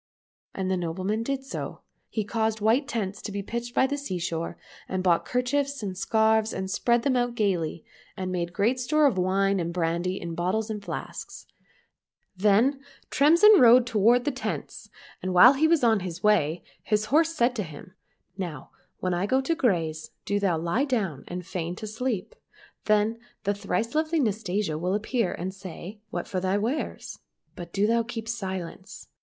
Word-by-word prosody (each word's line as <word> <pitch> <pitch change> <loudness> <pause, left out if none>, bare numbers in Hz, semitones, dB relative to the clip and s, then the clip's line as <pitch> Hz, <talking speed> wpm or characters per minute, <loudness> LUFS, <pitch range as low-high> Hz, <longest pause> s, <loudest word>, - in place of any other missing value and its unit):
And 190 -1 -2
the 190 - +1
nobleman 185 +5 -2
did 270 +3 -2
so. 270 - -6 0.3
He 215 - -2
caused 220 +1 -1
white 230 +7 +2
tents 205 -6 -3
to 210 - -5
be 200 0 -4
pitched 235 +3 -5
by - - +4
the 285 +2 -2
sea 190 -10 -4
shore, 165 -1 -3 0.3
and 185 -1 -2
bought 175 -2 +3
kerchiefs 275 +1 -1
and 190 -2 -3
scarves 220 +2 +2
and 190 0 -4
spread 235 +3 +2
them 265 -1 +2
out 245 -1 0
gaily, 175 -7 -1 0.3
and 185 -1 -3
made 175 -1 -2
great 215 +7 +1
store 305 +4 +2
of 230 -10 +3
wine 195 +1 +2
and 170 -1 -2
brandy 170 +2 -1
in 170 -1 -5
bottles 190 +6 -1
and 210 -2 -5
flasks. - - -7 0.9
Then 215 +8 +3 0.3
Tremsin 340 +8 +6
rode 245 0 +7
toward 235 +2 +3
the 290 - +1
tents, 260 - -5 0.3
and 185 -1 -2
while 245 +9 +9
he 300 +3 +3
was 325 -4 +3
on 225 -3 +4
the 180 -2 -6
way 175 -6 +2 0.2
his 210 -1 0
horse 325 +1 +4
said 245 -2 +2
to - - 0
him, 160 +2 -11 0.2
" - - -50
Now 165 -8 -5 0.3
when 185 -1 0
I 175 +3 0
go 260 +4 +3
to 300 +5 0
graze, 165 - 0 0.2
do 205 0 0
thou 190 -5 +1
lie 170 - 0
down 195 - -2
and 180 0 -6
feign 175 0 -4
to 215 - -7
sleep. 220 -1 -3 0.5
Then 215 +2 +2 0.2
the 205 - +1
thrice 225 +3 -2
lovely 315 +1 +1
Nastasia 205 - -1
will 180 +3 0
appear 215 -1 0
and 185 +2 -4
say, 190 +1 -9
' - - -50
What - - -4
for 185 - -2
thy 190 +2 0
wares? 235 +9 -3 0.2
' - - -44
but 175 -1 -8
do 200 +3 +1
thou 230 +2 +3
keep 230 -1 -6
silence. 190 -5 -6
210 Hz, 185 wpm, -26 LUFS, 185-240 Hz, 0.9 s, while